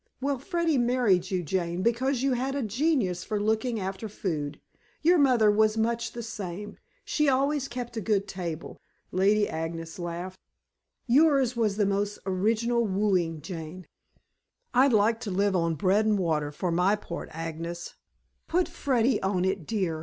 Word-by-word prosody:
"Well, 275 0 -1
Freddy 335 -1 0
married 240 -7 +2
you, 185 -2 -1
Jane, 175 +2 -2
because 255 +3 +1
you 275 -1 +2
had 260 +2 -1
a 280 - -1
genius 220 - 0
for 210 - -2
looking 220 +2 0
after 195 +3 -4
food. 150 -8 -3 0.4
Your 345 +2 +5
mother 245 -7 +5
was 215 +1 +3
much 230 0 0
the 235 - -5
same; 205 -3 -6 0.3
she 300 -2 +2
always 275 +1 +1
kept 240 -1 -6
a - - -1
good 200 0 0
table." 170 -4 -6 0.3
Lady 205 +3 +3
Agnes 165 +1 -5
laughed. 175 +2 -5 0.7
"Yours 270 -1 +4
was 215 -4 0
a 210 - +3
most 200 +1 -1
original 225 +5 +1
wooing, 185 -6 0
Jane." 165 +1 -7 0.9
"I'd 260 +2 +5
like 220 +1 +3
to 225 - -5
live 200 +1 +1
on 165 -2 +1
bread 195 +7 +2
and 210 -1 +3
water 155 -5 0
for 175 +4 -2
my 180 +4 +3
part, 190 -5 -7
Agnes." 165 +1 -5 0.5
"Put 355 +2 +1
Freddy 255 -8 +1
on 190 -1 0
it, 190 -4 -2
dear. 185 -8 -1
210 Hz, 160 wpm, -27 LUFS, 180-240 Hz, 0.9 s, Your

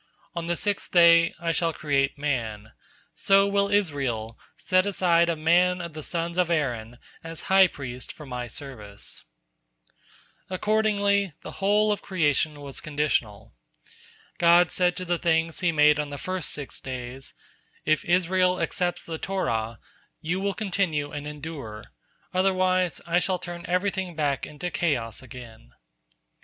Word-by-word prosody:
On 170 -2 -4
the 175 - 0
sixth 205 +3 -2
day, 170 -1 +7
I 170 -1 0
shall 165 0 0
create 140 -3 0
man; 115 -7 -3 0.4
so 195 0 +4
will 200 0 +1
Israel 135 - 0 0.2
set 185 +1 +2
aside 170 -3 +3
a 170 - +1
man 175 +3 +3
of 170 -2 -6
the 155 - -6
sons 170 +2 -3
of 180 -2 +2
Aaron 125 -8 -1 0.3
as 165 0 -5
high 190 -1 +8
priest 130 -6 -7
for 150 - -11
My 125 -2 -5
service." 110 -7 -8 1.3
Accordingly, 200 -1 +1
the - - -7
whole 210 +2 +3
of 205 - -1
creation 150 -4 0
was 140 -1 -7
conditional. 120 -8 -1 0.9
God 175 +1 +5
said 180 -1 +2
to 185 - -3
the 175 -1 0
things 165 -1 +1
He 175 -2 +2
made 150 -1 +5
on 150 -1 -2
the 145 - -6
first 185 +2 -2
six 145 -2 -5
days: 130 0 -7 0.5
"If 155 0 +2
Israel 185 0 +2
accepts 175 -1 -1
the 160 -1 -5
Torah, 115 - -2 0.4
you 175 +4 -2
will 200 0 -1
continue 180 -8 -1
and 145 0 -6
endure; 145 -8 -8 0.4
otherwise, 185 -1 +2
I 170 +1 +2
shall 180 +1 +1
turn 175 -1 -7
everything 185 0 -1
back 145 -3 -1
into 175 +4 -5
chaos 130 -11 -1
again." 115 - -12
165 Hz, 145 wpm, -26 LUFS, 140-185 Hz, 1.3 s, high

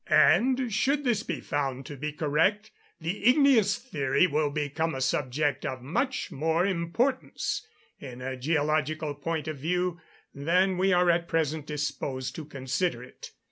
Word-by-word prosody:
And 255 -2 +4
should 275 +6 +1
this 235 -5 +1
be - - -4
found 135 -4 -2
to 145 - -7
be 150 +3 -4
correct, 165 +8 +1 0.3
the 175 +6 -4
igneous 250 -5 +5
theory 140 - +1
will 150 -2 +1
become 150 +2 -2
a - - -3
subject 145 +2 0
of 130 -2 -4
much 260 - -1
more 160 +5 +1
importance, 240 - -1 0.3
in 125 -3 -9
a 130 +1 -4
geological 155 +2 0
point 160 +2 -3
of 155 -2 -4
view, 180 +3 -1 0.3
than 180 +6 +1
we 190 +1 +3
are 180 -1 +4
at 170 0 0
present 155 -2 -1
disposed 145 -3 -3
to 160 - -6
consider 135 0 -2
it. 125 - -11
160 Hz, 150 wpm, -28 LUFS, 145-190 Hz, 0.3 s, igneous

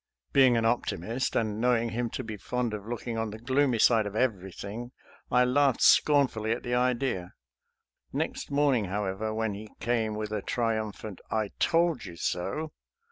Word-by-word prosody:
Be 135 -1 +7
ing 120 -2 +3
an 115 - +1
optimist, 120 +1 -1
and 110 -1 0
knowing 120 -1 +2
him 120 +1 -2
to 130 - -4
be 110 -2 -6
fond 120 +2 -2
of 105 0 -6
looking 120 -1 -4
on 110 -1 -1
the 105 - -7
gloomy 130 +2 +1
side 110 -1 +4
of 100 - -7
everything, 110 +1 -3 0.4
I 125 0 +4
laughed 135 0 +3
scornfully 130 -7 +4
at 120 - -6
the 120 - -3
idea. 125 -7 0 0.8
Next - - -3
morning, 140 -6 +2
however, 100 +2 -2
when 110 -1 -1
he 105 +2 -8
came 115 -3 0
with 105 0 -4
a 105 -1 -2
triumphant 110 -4 -2
" - - -36
I 105 - -4
told 170 -4 +2
you 85 -3 -8
so!" 100 - -2
115 Hz, 175 wpm, -28 LUFS, 105-125 Hz, 0.8 s, Be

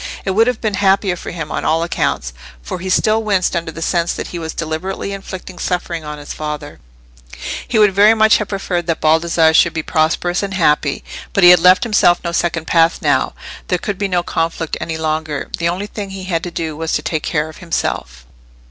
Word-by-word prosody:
—it 190 - 0
would 225 +5 +3
have 250 -3 0
been 215 -2 -1
happier 195 -1 +2
for - - -8
him 160 -3 -6
on - - -2
all 160 +1 +1
accounts; 60 - -1 0.3
for 180 - -5
he 185 +2 -5
still 215 +4 +2
winced 195 -5 +1
under 170 -1 -2
the 165 +1 -6
sense 170 -1 0
that - - -5
he 175 - -5
was 160 -1 -4
deliberately 165 +5 -4
inflicting 190 -2 -8
suffering 175 -2 -2
on 150 0 -6
his 145 0 -8
father: 150 -1 -6 0.9
he 235 - 0
would 210 -2 +5
very 210 +3 +6
much 220 0 +5
have 210 - -3
preferred 180 -3 -3
that 165 - 0
Baldassarre 160 0 +3
should - - +4
be 160 - -3
prosperous 170 +3 0
and 195 -1 -3
happy. 150 -5 +1 0.3
But 200 - +2
he 175 - +10
had 180 - +7
left 180 +2 +5
himself 210 -6 +3
no 170 - -2
second 170 -1 -1
path 165 +1 +3
now: - - +1 0.3
there - - +1
could 205 -4 -4
be 200 - 0
no 180 -2 0
conflict 165 -1 -2
any 160 -1 -3
longer: 155 -2 -3
the 170 0 +1
only 185 +4 -3
thing 205 -1 -6
he 190 -1 -7
had 175 -3 -1
to - - -3
do 160 -2 -4
was 160 +1 -3
to 150 - 0
take 155 -1 -2
care 150 -1 -1
of 155 - -11
himself. 65 - -3
170 Hz, 220 wpm, -17 LUFS, 160-195 Hz, 0.9 s, he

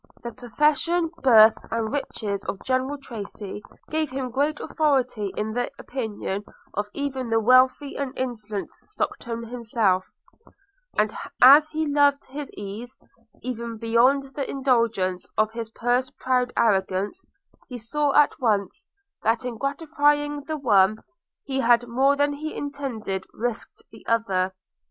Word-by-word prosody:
The 235 - -5
profession, 300 +8 +1
birth, 220 -4 +6
and 225 +1 -2
riches 210 -8 -3
of 195 - -5
General 260 +2 0
Tracy, 210 -5 -7 0.3
gave 310 -1 0
him 260 -1 -4
great 290 +4 0
authority 255 - 0
in 215 +1 -2
the 245 +1 -1
opinion 210 -5 -4 0.3
of 205 +1 -2
even 265 -3 -3
the 225 0 +3
wealthy 255 +4 +4
and 280 -2 -2
insolent 215 -5 -4
Stockton 235 -1 -4
himself; 225 -6 0 0.9
and 215 0 +2 0.3
as 285 +5 +8
he 315 0 -1
loved 285 -1 +3
his 280 +1 -7
ease, 210 +5 -7 0.5
even 235 -2 -4
beyond 235 +5 +3
the 280 -2 -3
indulgence 230 -9 0
of 215 0 +2
his 230 -1 -5
purse 245 +3 0
proud 250 -1 0
arrogance, 195 - +1 0.4
he 250 - -7
saw 285 +6 0
at 295 -1 +5
once, 205 -6 0 0.3
that 230 +3 +1
in 245 -2 -3
gratifying 290 +2 0
the 315 -1 -3
one, 215 -6 +3 0.4
he 270 -2 -2
had 240 -1 +4
more 265 +4 +3
than 290 0 +1
he 310 +2 -5
intended 245 -10 -4
risked 235 0 -4
the 220 - -14
other. 190 -5 +1
245 Hz, 135 wpm, -24 LUFS, 220-280 Hz, 0.9 s, as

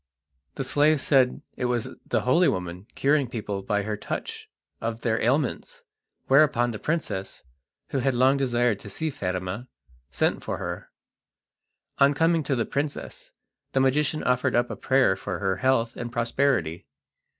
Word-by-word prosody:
The 135 - -2
slave 145 +3 +3
said 130 0 +2
it 125 - -2
was 125 -1 0 0.2
the - - +1
holy 160 +8 +4
woman, 90 +2 -3
curing 140 -2 +2
people 105 -4 -4
by 105 +1 -1
her 105 +1 -2
touch - - -6 0.3
of 115 0 -3
their 110 -2 0
ailments, 135 +3 -1 0.4
whereupon 135 -3 +4
the 110 - -6
princess, 105 - -3 0.5
who 135 - -1
had 130 0 +1
long 130 +3 +4
desired 120 -5 +1
to 100 - -10
see 160 +10 -3
Fatima, 95 +2 -4 0.4
sent - - 0
for - - -3
her. - - -6 1.1
On 140 +1 +5
coming 165 +1 +3
to 140 - +1
the 115 - 0
princess 145 +1 -4 0.4
the 135 - +2
magician 145 +3 +1
offered 125 -1 +1
up 120 +1 +1
a - - -4
prayer 130 -7 +3
for 95 -1 -4
her 95 -1 -1
health 120 -1 +1
and 120 -1 -5
prosperity. 115 - 0
125 Hz, 155 wpm, -26 LUFS, 105-140 Hz, 1.1 s, On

